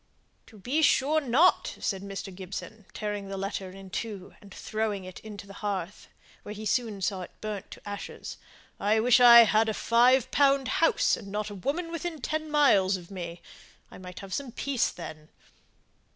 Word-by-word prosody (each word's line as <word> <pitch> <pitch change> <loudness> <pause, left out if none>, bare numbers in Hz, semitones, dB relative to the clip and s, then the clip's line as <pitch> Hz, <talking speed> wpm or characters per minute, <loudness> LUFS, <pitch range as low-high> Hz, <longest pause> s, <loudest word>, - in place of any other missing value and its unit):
"To 220 - -16
be 255 +10 -1
sure 305 +1 +3
not," 285 +7 +3
said 195 -2 -2
Mr. 195 -1 -7
Gibson, 195 +3 -8
tearing 205 -2 -4
the 195 0 -5
letter 195 -1 -4
in 190 0 -12
two, 205 -4 -5
and 200 -2 -15
throwing 215 -1 -3
it 185 -1 -9
into 205 -2 -10
the 195 - -12
hearth, 200 -2 -4 0.3
where 210 - -8
he 215 +1 -7
soon 215 -2 -1
saw 190 -2 -1
it 180 - -7
burnt 210 -3 -5
to - - -12
ashes. 205 0 -7 0.4
"I 215 +2 +2
wish 245 +2 +5
I'd 235 -2 +8
a 215 - -2
five 245 +2 +3
pound 275 -2 +3
house 330 - +3
and 210 - -10
not 210 +1 -4
a - - -6
woman 295 - -3
within 335 -1 -4
ten 310 +4 -3
miles 205 -11 +4
of 175 +1 -13
me. 175 -2 -7 0.5
I - - -11
might 180 -1 -9
have 195 -1 -8
some 275 +1 -3
peace 265 +1 0
then." 155 -3 -9
210 Hz, 180 wpm, -28 LUFS, 195-250 Hz, 0.5 s, I'd